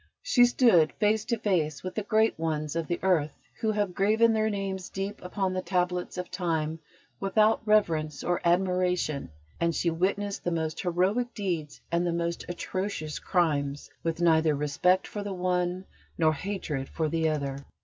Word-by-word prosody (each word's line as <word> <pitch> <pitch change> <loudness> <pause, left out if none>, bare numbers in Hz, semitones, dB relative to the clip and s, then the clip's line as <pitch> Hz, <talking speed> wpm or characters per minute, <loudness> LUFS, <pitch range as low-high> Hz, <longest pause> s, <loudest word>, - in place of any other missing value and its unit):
She 255 - +5
stood 230 -10 +4
face 215 0 +1
to 235 - 0
face 160 -9 0
with 185 - -4
the 215 - -2
great 220 -2 +2
ones 155 -2 -2
of 165 -2 -1
the 175 - -1
earth 160 -6 +1 0.2
who 220 - 0
have 205 -3 -1
graven 220 +4 +3
their 220 0 +2
names 195 -3 -3
deep 195 +2 -4
upon 185 +1 -2
the 185 - -1
tablets 180 0 -1
of 180 -1 -5
Time 165 -3 -1 0.4
without 215 +3 +3
reverence 160 -9 +2
or 175 0 0
admiration; 180 -4 +1 0.3
and 170 0 +1
she 170 - +1
witnessed 200 +4 -1
the - - 0
most 160 -2 -2
heroic 195 +7 0
deeds 170 -9 -3
and 170 +1 +1
the 170 - 0
most 170 0 -2
atrocious 175 -3 -3
crimes 145 -6 0
with 165 0 -2
neither 160 -2 +4
respect 150 +6 +2
for 210 - -5
the 205 -1 -4
one 180 0 -1 0.3
nor 160 -1 +3
hatred 155 -6 -4
for 160 -2 -1
the 160 +1 +1
other. 140 -3 -2
180 Hz, 170 wpm, -28 LUFS, 160-200 Hz, 0.4 s, She